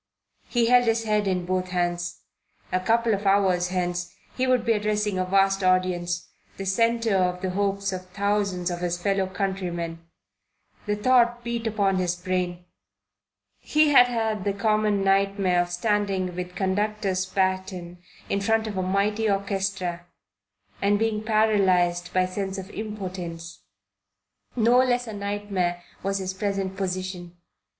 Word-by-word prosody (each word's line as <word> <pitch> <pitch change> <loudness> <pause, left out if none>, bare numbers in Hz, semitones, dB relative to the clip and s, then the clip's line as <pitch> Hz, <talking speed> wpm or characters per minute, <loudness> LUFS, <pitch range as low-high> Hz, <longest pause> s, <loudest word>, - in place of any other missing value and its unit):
He 240 -2 +2
held 245 +1 +5
his 225 0 +1
head 210 -2 +1
in 180 -2 0
both 185 0 -1
hands. 175 -1 -2 0.5
A 185 - +2
couple 230 +4 +2
of 200 0 -1
hours 190 -3 +3
hence 180 -1 -2 0.2
he 260 0 0
would 250 -2 +2
be 230 - +3
addressing 210 -2 0
a 185 - +1
vast 195 +1 +2
audience, 180 -1 +1 0.3
the 195 - -5
centre 230 +2 +2
of 180 -1 +1
the 185 - -1
hopes 200 0 -1
of 185 0 -6
thousands 200 -2 -1
of 175 - -4
his 175 0 -2
fellow 195 0 0
countrymen. 180 -4 -3 0.9
The 210 - +1
thought 240 +2 +3
beat 235 -1 -2
upon 200 -3 +1
his 180 -1 0
brain. 180 -1 -3 0.9
He 305 0 +3
had 250 -4 +7
had 220 -4 -1
the 200 - 0
common 210 0 +1
nightmare 195 -2 +2
of 175 0 -4
standing 190 -1 0
with 180 0 -5
conductor's 195 -1 -1
baton 185 -2 -2 0.3
in 200 - -1
front 225 +1 +1
of 210 -3 -5
a - - +1
mighty 205 +4 +1
orchestra 195 -3 -2 0.7
and 205 +1 +3
being 220 0 0
paralyzed 190 -5 +2
by 185 0 +2
sense 190 +1 -4
of 190 +1 -7
impotence. 185 -6 -6 1.0
No 240 +1 +4
less 245 -1 +2
a 220 - -7
nightmare 200 -4 -2 0.2
was 195 +1 -1
his 190 -1 -3
present 195 -1 -2
position. 185 -2 -4
195 Hz, 145 wpm, -25 LUFS, 180-210 Hz, 1.0 s, had